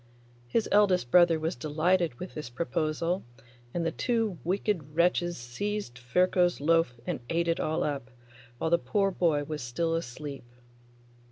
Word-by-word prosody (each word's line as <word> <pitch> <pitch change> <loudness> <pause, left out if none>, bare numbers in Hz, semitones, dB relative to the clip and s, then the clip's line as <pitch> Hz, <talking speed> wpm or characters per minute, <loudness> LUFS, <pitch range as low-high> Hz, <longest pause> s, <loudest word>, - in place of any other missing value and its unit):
His 225 - +1
eldest 185 -11 +3
brother 175 -2 +6
was 160 +1 -2
delighted 155 +4 +1
with 180 - -7
this 150 -5 -6
proposal, 165 +5 -1 0.5
and 170 +3 -2
the 165 - +1
two 225 -8 -1
wicked 180 -5 -1
wretches 175 0 +2
seized 125 +3 -4
Ferko's 180 +7 +2
loaf 155 -5 +2
and 175 -7 -2
ate 170 +1 +1
it 165 - +1
all 155 +1 0
up, 140 -4 -3 0.5
while 160 - -1
the 170 - +5
poor 195 +10 +1
boy 165 -5 +1
was 150 0 -5
still 165 +8 -1
asleep. 140 -4 -5
165 Hz, 150 wpm, -29 LUFS, 145-180 Hz, 0.5 s, brother